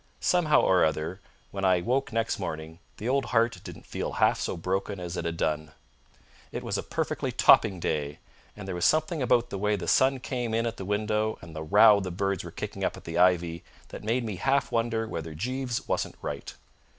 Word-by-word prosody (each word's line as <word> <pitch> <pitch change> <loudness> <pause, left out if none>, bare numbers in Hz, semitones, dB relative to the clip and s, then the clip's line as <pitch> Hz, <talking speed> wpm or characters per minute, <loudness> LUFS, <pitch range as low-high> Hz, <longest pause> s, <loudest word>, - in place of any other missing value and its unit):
Somehow 170 -4 +3
or 95 -1 +4
other, 80 +4 -1 0.3
when 95 -1 -5
I 90 -2 +4
woke 125 +8 0
next 115 -1 -1
morning 80 -2 -5 0.2
the 110 - -5
old 135 0 +1
heart 115 -5 +1
didn't - - -10
feel - - -4
half - - +3
so - - -2
broken 95 +3 -2
as 90 0 -5
it 85 - -3
had 85 0 -2
done. 80 -1 -1 0.8
It - - -5
was - - -2
a - - 0
perfectly - - -2
topping 95 -5 +5
day, 75 -3 -2 0.4
and 105 -2 -8
there 95 - -3
was 90 -1 -3
something 155 0 +2
about 120 -1 +2
the 100 - -4
way 105 +1 +1
the 95 - -5
sun 130 0 +3
came 120 -3 -3
in 115 +1 +1
at 115 - -3
the 95 - -6
window 105 +2 0
and 80 -2 -11
the 80 - -4
row 105 +6 +6
the 95 -2 -4
birds 95 +1 -1
were - - -7
kicking - - -6
up - - -1
in - - -12
the 85 +1 -3
ivy 85 -2 +3 0.3
that - - -9
made 115 +4 0
me 105 -5 -4
half 135 +6 +1
wonder 115 -1 0
whether 80 -5 -5
Jeeves 125 - -3
wasn't - - -1
right. - - -5
100 Hz, 210 wpm, -27 LUFS, 85-115 Hz, 0.8 s, row